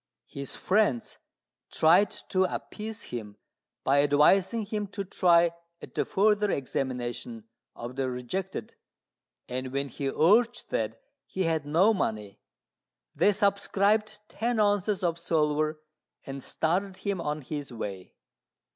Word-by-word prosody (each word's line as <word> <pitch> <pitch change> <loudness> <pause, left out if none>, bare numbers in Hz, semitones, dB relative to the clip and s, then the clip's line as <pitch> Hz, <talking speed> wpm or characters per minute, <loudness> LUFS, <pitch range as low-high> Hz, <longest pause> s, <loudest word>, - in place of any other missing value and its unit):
His 140 -1 -7
friends 190 - +1 0.5
tried 175 +6 +5 0.2
to 185 0 +3
appease 215 +3 -5
him 105 -4 -6 0.5
by 140 +1 +4
advising 180 +10 +3
him 210 0 -3
to 200 0 -5
try 175 -3 +4 0.3
at - - -11
the - - 0
further 210 +1 +2
examination 125 - -3 0.3
of 120 +2 -7
the 135 -1 0
rejected, 125 - -4 0.7
and 130 +1 -4
when 140 +1 -2
he 140 0 -3
urged 225 - +3
that - - -1 0.3
he 190 - -2
had 160 -3 0
no 180 +9 +4
money, 105 - -3 0.7
they 205 - +4
subscribed 205 +1 +1
ten 235 0 -1
ounces 205 -1 +2
of 170 -1 0
silver 155 -2 +1 0.5
and 135 -1 -6
started 185 +4 0
him 200 -4 -2
on 150 -1 -3
his 145 0 -5
way. 100 -5 -6
170 Hz, 125 wpm, -28 LUFS, 135-200 Hz, 0.7 s, tried